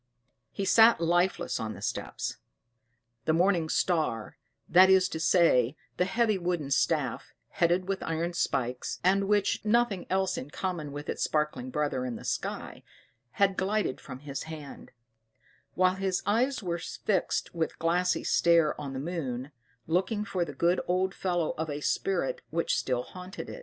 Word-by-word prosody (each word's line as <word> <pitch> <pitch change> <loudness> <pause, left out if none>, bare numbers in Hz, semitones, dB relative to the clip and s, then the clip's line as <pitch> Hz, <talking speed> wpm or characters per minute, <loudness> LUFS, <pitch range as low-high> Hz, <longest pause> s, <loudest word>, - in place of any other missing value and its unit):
He 195 - -3
sat 225 +3 +6
lifeless 175 +2 +1
on 110 -1 -4
the - - -11
steps: - - -3 0.9
the 160 - +2
morning 170 -1 +2
star,* 155 -10 0 0.3
that 185 +2 +7
is 190 -1 +5
to 160 - -4
say, 160 -7 +4 0.2
the 180 - +2
heavy 215 +1 +1
wooden 175 -5 -2
staff, 140 -2 0
headed 175 +2 +1
with 195 -1 -2
iron 165 +2 -2
spikes, 125 -7 -2
and 195 +2 +3
which 205 -1 +2
had - - -32
nothing 235 -5 +2
else 190 0 0
in 130 - -8
common 165 -3 -4
with 145 +1 -7
its - - -2
sparkling 150 -4 -1
brother 145 -2 -1
in 125 -2 -3
the - - -9
sky, - - -4 0.5
had 195 -1 +2
glided 200 -6 0
from 130 +1 -9
his 140 -2 -5
hand; 150 -3 -9 0.9
while 185 0 +4
his 190 -1 -1
eyes 235 +4 +1
were 170 -2 -2
fixed 185 +2 -1
with 165 -2 -2
glassy 175 +2 +1
stare 170 -3 +4
on 140 -2 -5
the 130 - -4
moon, 140 -4 -4 0.3
looking 190 +6 0
for 190 -3 -1
the 150 -4 -6
good 170 +5 +2
old 185 +2 +1
fellow 175 -5 -1
of 160 0 -2
a 145 0 -3
spirit 175 0 -1
which 165 +1 0
still 125 -2 -1
haunted 180 +5 -9
it. - - -8
175 Hz, 165 wpm, -29 LUFS, 150-190 Hz, 0.9 s, that